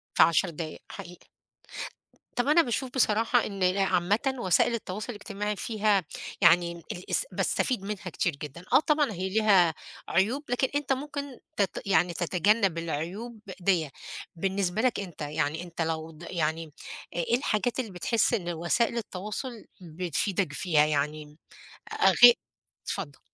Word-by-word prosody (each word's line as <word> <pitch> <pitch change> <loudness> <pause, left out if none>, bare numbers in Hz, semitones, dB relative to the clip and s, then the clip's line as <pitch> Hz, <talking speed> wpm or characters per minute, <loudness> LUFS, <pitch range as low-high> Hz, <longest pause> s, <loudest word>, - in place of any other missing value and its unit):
في - - +6
10 170 +2 +4
دقايق، 155 -1 -6
حقيقي. 175 +1 -10 1.1
طَب 245 - +1
أنا 310 +3 +6
باشوف 255 -1 -2
بصراحة 230 -1 +3
إن 195 -2 -5
ال 185 +1 +2
عامةً 200 +7 +1
وسائل 195 +3 +3
التواصل 210 -1 -5
الاجتماعي 210 -1 -4
فيها 210 -3 +1 0.4
يعني 170 0 +5
ام 170 0 -11
الاس 185 - -1
باستفيد 250 -7 0
منها 205 0 -5
كتير 170 -2 -1
جدًا، 150 +4 -8
آه - - +7
طبعًا 300 -4 +2
هي 190 0 -3
ليها 190 -5 +4 0.3
عيوب، 220 - +1
لكن 250 +2 +1
أنت 290 -2 0
ممكن 280 -1 -4 0.2
تت 200 -3 0
يعني 180 -2 +3
تتجنب 180 +2 +2
العيوب 175 +9 -4 0.2
دِيّة، 175 -5 +1 0.5
بالنسبة 190 +2 0
لك 250 -4 +1
أنت 185 -4 -8
يعني 150 +2 -2
أنت 170 -1 -4
لو 160 0 -2
ض 160 +1 -14
يعني 160 -2 -1 0.4
إ - - -6
إيه 175 +8 +2
الحاجات 245 0 0
اللي 230 -5 -4
بتحس 200 +5 +1
إن 175 -4 -2
وسائل 175 +9 0
التواصل 215 +3 -6 0.2
بتفيدك 180 +1 -1
فيها؟ 150 -2 +3
يعني 150 0 -2 0.6
أ - - -5 0.2
أ - - +5
غي 240 0 +12 0.5
اتفضل. 160 -8 -4
190 Hz, 150 wpm, -28 LUFS, 170-225 Hz, 1.1 s, غي